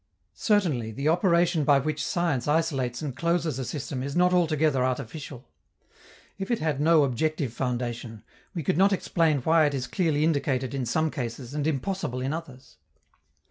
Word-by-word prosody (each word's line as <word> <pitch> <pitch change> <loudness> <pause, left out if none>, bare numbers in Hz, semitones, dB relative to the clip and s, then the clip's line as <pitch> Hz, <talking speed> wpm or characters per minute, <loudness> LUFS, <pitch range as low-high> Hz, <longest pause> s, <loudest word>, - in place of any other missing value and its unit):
Certainly, 155 - +1
the 140 +7 -2
operation 170 -1 +3
by 145 0 +5
which 150 +2 -2
science 165 -8 -1
isolates 140 -5 0
and 140 -5 -4
closes 170 -2 0
a - - -2
system 135 -2 -4
is 140 +1 -4
not 180 +1 +4
altogether 155 -6 +2
artificial. 130 +1 -4 0.9
If 195 - -4
it 235 - +2
had 155 -5 -1
no 160 0 +5
objective 140 0 -1
foundation, 120 -3 -4 0.3
we 165 - -3
could 145 - 0
not 195 +1 +5
explain 165 -6 +1
why 160 +2 +4
it 145 - -2
is 130 -2 -2
clearly 155 +1 0
indicated 140 -4 0
in 130 -3 -2
some 160 +5 +1
cases 120 -1 -5
and 150 0 -1
impossible 160 -2 -2
in 130 +3 -2
others. 135 -5 -9
145 Hz, 165 wpm, -26 LUFS, 130-165 Hz, 0.9 s, by